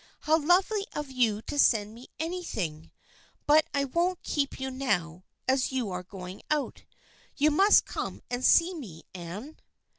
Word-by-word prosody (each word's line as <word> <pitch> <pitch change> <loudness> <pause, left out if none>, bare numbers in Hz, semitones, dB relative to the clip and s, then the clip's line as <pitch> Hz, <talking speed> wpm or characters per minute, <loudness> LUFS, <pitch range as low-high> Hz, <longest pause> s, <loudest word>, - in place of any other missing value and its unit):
How 315 +1 +3
lovely 390 +5 +2
of 295 -2 -5
you 225 -4 +1
to 290 - -4
send 215 -5 +3
me 240 +3 -13
anything! 265 - -4 0.6
But 305 +1 +5
I 280 -1 +1
won't 345 +6 -1
keep 280 -2 -2
you 265 0 -3
now, 185 -10 -2 0.2
as 260 0 +2
you 250 -6 -2
are 180 0 -3
going 185 0 -9
out. 300 -1 -2 0.5
You 300 +2 +4
must 390 +7 +5
come - - -5
and 245 +1 -3
see 345 +6 +5
me, 200 - -9
Anne." 185 - -8
265 Hz, 155 wpm, -28 LUFS, 205-315 Hz, 0.6 s, But